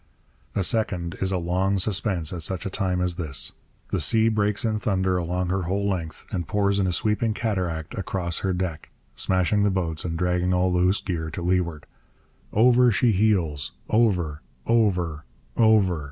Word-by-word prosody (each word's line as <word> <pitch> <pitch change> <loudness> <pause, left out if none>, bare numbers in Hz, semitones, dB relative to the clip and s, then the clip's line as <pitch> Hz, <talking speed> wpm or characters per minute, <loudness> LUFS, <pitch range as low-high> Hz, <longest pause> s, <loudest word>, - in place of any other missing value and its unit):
A 100 - +1
second 90 -6 0
is 95 0 +2
a 95 - +1
long 90 +3 0
suspense 95 -4 0
at 85 - -4
such 90 +2 -2
a 100 - -3
time 90 -2 -1
as 90 -1 0
this. 65 -7 -3 0.4
The - - 0
sea 115 -1 +3
breaks 105 -1 0
in 110 -1 0
thunder 95 -3 0
along 90 +1 -2
her 95 0 0
whole 100 +1 0
length, 85 -5 -4
and 85 -3 -3
pours 100 -1 +1
in 95 - +1
a - - +1
sweeping 105 +4 0
cataract 90 -9 -2
across 90 -3 -2
her 95 - -1
deck, 90 -3 -3 0.3
smashing 95 +2 +1
the 100 - +3
boats 85 -5 -2
and 80 -2 -3
dragging 90 +1 +1
all 90 0 +2
loose 90 +2 +2
gear 80 -4 -3
to 85 +2 -6
leeward. 85 -3 0 0.7
Over 125 +2 +5
she 115 +3 +3
heels 85 -10 +1 0.2
over, 90 -10 +1 0.2
over, 90 -9 +1 0.3
over! 105 -7 +4
95 Hz, 170 wpm, -24 LUFS, 85-105 Hz, 0.7 s, Over